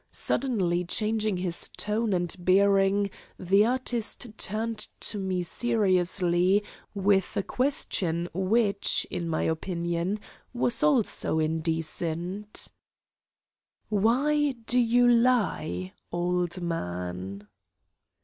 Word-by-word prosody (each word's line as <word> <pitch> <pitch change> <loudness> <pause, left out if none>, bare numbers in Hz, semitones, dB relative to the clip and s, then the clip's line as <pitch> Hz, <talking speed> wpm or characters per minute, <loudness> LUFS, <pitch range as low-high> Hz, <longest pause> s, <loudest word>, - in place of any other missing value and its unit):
Suddenly 190 -9 0
changing 215 +2 0
his 180 -1 -2
tone 215 +1 -1
and 175 -2 0
bearing, 195 +2 +3 0.3
the 195 +4 +3
artist 240 -2 -2
turned 220 +2 -2
to 210 - -2
me 185 -2 -1
seriously 185 -3 +2 0.3
with 195 -1 +1
a 200 - +1
question 180 - 0
which, 200 +3 +2
in 170 -1 -3
my 160 - 0
opinion, 170 +3 -2 0.4
was 240 -1 +2
also 270 - +2
indecent: 165 +5 -2 1.2
"Why 270 +8 +2
do 250 +2 +3
you 245 +1 +4
lie, 230 - +1 0.2
old 175 +1 -1
man?" 95 - -4
195 Hz, 90 wpm, -27 LUFS, 175-225 Hz, 1.2 s, you